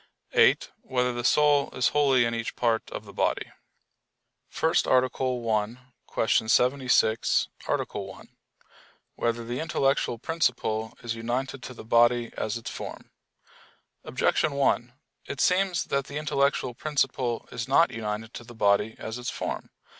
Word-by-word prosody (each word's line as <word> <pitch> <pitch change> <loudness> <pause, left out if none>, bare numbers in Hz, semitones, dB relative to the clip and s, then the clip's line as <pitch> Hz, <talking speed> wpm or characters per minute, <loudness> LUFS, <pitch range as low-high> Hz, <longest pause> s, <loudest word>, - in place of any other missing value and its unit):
(8) - - +4
Whether 125 -1 0
the 120 0 -4
soul 145 +1 +4
is 125 - +2
wholly 135 -4 +3
in 115 - -1
each 115 0 -3
part 115 -2 0
of - - -7
the - - -12
body? - - 0
_______________________ - - -21 1.0
FIRST - - +1
ARTICLE 130 -1 +1
[I, 110 +1 0 0.3
Q. 115 - 0 0.2
76, 125 -3 +3 0.2
Art. - - -1
1] - - -7 0.9
Whether 115 0 -2
the 120 +2 -4
Intellectual 135 -6 0
Principle 115 -6 -1
Is 120 -1 -2
United 125 +4 -3
to 130 - -8
the - - -10
Body 120 +1 +3
As 110 +1 -2
Its 115 - -7
Form? - - -8 0.9
Objection 155 - +1
1: 130 -3 +1 0.4
It 140 - -6
seems 185 -1 +2
that 140 -1 -1
the 140 - -6
intellectual 140 -4 0
principle 130 -3 -1
is 115 0 -4
not 165 +6 +4
united 110 0 -4
to - - -8
the 120 0 -13
body 105 +1 +2
as 110 +2 -6
its 125 - -4
form. - - -4
125 Hz, 145 wpm, -27 LUFS, 115-135 Hz, 1.0 s, 8